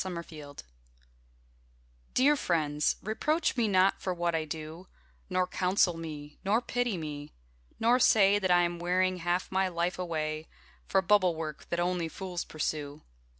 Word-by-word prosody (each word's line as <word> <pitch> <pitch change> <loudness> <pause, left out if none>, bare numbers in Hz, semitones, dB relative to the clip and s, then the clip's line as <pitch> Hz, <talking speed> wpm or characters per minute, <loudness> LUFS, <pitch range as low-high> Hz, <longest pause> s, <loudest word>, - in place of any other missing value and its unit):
Dear 190 -1 -4
Friends 155 -4 -9 1.5
Dear 285 +4 +5
friends, 150 - 0
reproach 305 - 0
me 235 -3 +2
not 190 -1 +3
for 185 -1 -2
what 175 0 0
I 160 -1 0
do, 160 +3 -7 0.4
Nor 185 -1 +1
counsel 180 -1 +2
me, 150 -3 -8
nor 205 +4 +3
pity 245 -4 -1
me; 150 -2 -6 0.5
nor 240 +3 +4
say 205 -4 +5
That 190 -2 -1
I 175 0 +5
am 175 0 -2
wearing 185 +1 +1
half 175 +1 -1
my 190 0 +2
life 175 +1 -2
away 155 -3 -3 0.4
For 190 -1 +2
bubble 185 -2 +4
work 155 -2 -6
that 170 - -1
only 175 -1 0
fools 180 0 -5
pursue. 150 -1 -4
175 Hz, 150 wpm, -30 LUFS, 160-190 Hz, 1.5 s, Dear